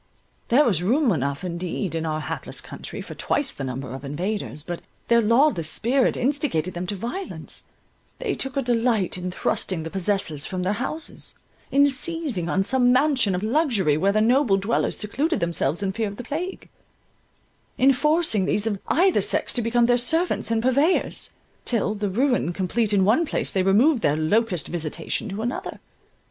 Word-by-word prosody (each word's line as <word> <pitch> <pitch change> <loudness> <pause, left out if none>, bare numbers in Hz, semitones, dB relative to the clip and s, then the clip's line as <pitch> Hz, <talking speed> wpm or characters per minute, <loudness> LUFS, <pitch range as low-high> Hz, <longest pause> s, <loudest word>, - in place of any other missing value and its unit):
There 275 +6 +4
was 185 -8 +2
room 245 - +2
enough 140 -2 -2
indeed 180 +1 -3
in 165 0 -2
our 155 0 -2
hapless - - -5
country - - -7
for - - -9
twice 285 -2 -1
the 140 - -6
number 130 -1 -5
of 135 +1 -7
invaders; 165 +2 -3
but 175 +1 -5 0.3
their 235 0 +5
lawless 230 - +3
spirit 250 - +2
instigated 245 - 0
them 175 +1 -4
to 205 - -2
violence; 245 - -5 0.5
they 460 -5 -2
took 270 +1 -3
a 275 - +1
delight 230 -4 +1
in 180 0 -4
thrusting 180 -1 -1
the 160 - -6
possessors 190 -6 -1
from 185 +1 -4
their 190 +3 +1
houses; 270 +8 -5 0.3
in 280 +1 +5
seizing 275 - -2
on 195 - +1
some 245 +3 +3
mansion 255 -7 +3
of 180 - -3
luxury, 225 - +2
where 195 +6 +2
the 215 +1 +2
noble 240 -2 +3
dwellers 200 +4 0
secluded 285 +10 0
themselves 170 0 0
in 195 - 0
fear 220 +2 -2
of 200 - -6
the 245 - -7
plague; 340 +9 -5 1.1
in 270 +2 +5
forcing 300 - +1
these 205 +2 0
of 205 -3 -1
either 370 +3 +3
sex - - 0
to 245 - +1
become 235 +1 +2
their 245 0 +3
servants 320 0 +1
and 225 0 0
purveyors; 280 +8 +1 0.3
till, 220 -3 0
the 205 -1 -2
ruin 245 -4 +1
complete 205 +4 0
in 195 -2 +3
one 230 - +4
place, 320 - -2
they 190 - +1
removed 225 +9 +4
their 145 -4 +2
locust 180 +2 +1
visitation 165 +4 -3
to 200 +3 -4
another. 240 +2 -4
215 Hz, 180 wpm, -24 LUFS, 180-260 Hz, 1.1 s, their